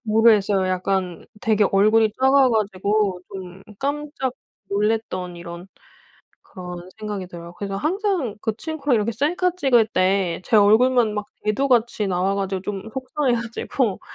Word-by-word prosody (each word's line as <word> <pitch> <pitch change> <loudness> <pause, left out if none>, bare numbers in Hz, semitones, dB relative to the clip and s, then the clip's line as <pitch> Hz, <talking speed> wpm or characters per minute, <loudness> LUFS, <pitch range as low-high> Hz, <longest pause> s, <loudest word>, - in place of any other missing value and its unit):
모르겠어요. 215 -4 +3
약간 185 -1 -2
되게 215 -2 +2
얼굴이 215 +2 +4
작아 265 0 +5
가지고 205 -3 0
좀 185 -1 -9 0.2
깜짝 285 -2 -3 0.4
놀랐던 200 -4 -1
이런 170 +1 -9 0.8
그런 180 -1 -9
생각이 210 -3 -5
들어요. 170 -1 -10
그래서 195 +1 -4
항상 345 - -1
그 220 - -1
친구랑 295 -3 -1
이렇게 215 +2 0
셀카 350 +7 0
찍을 245 - +3
때 185 -2 +1
제 220 - +2
얼굴만 220 +2 +4
막 210 -1 -3 0.2
대두같이 235 -1 +1
나와가지고 190 +1 -1
좀 195 -1 -4
속상해 260 0 -1
가지고 235 -1 -2
210 Hz, 300 characters per minute, -22 LUFS, 190-250 Hz, 0.8 s, 작아